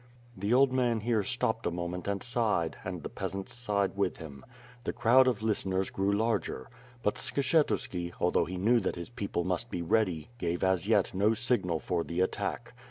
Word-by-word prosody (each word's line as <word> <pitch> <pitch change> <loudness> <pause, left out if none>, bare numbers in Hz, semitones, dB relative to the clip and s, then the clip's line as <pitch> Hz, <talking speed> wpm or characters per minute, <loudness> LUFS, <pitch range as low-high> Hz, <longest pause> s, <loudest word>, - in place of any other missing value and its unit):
'* - - -26
The 100 +2 -2
old 130 +1 +5
man 120 -3 +1
here 115 -1 +1
stopped 115 +2 0
a - - +2
moment 85 +1 -4
and 100 -1 -1
sis:hed, 110 -9 0
and 90 -4 -5
the - - -3
peasants 95 0 -5
sighed 105 -6 0
with 100 -2 0
him. 70 -4 -10 0.4
The - - -2
crowd 130 +3 +5
of 115 -4 0
listeners 95 -3 0
grew 95 +1 0
larger. 110 - -1 0.3
But 105 - +1
Skshetuski, 130 - 0
although 90 - +2
he 90 +1 -5
knew 115 +6 +4
that 100 - -2
his 85 +5 -7
people 100 -7 -2
must 90 +6 -2
be 85 - -3
ready, 90 -3 +1
gave 85 -1 -1
as 95 -2 +1
yet - - +3
no 105 +4 +3
signal 110 -8 0
for 85 0 -1
the 85 +2 -4
attack. 105 +5 -2
100 Hz, 190 wpm, -30 LUFS, 90-115 Hz, 0.4 s, old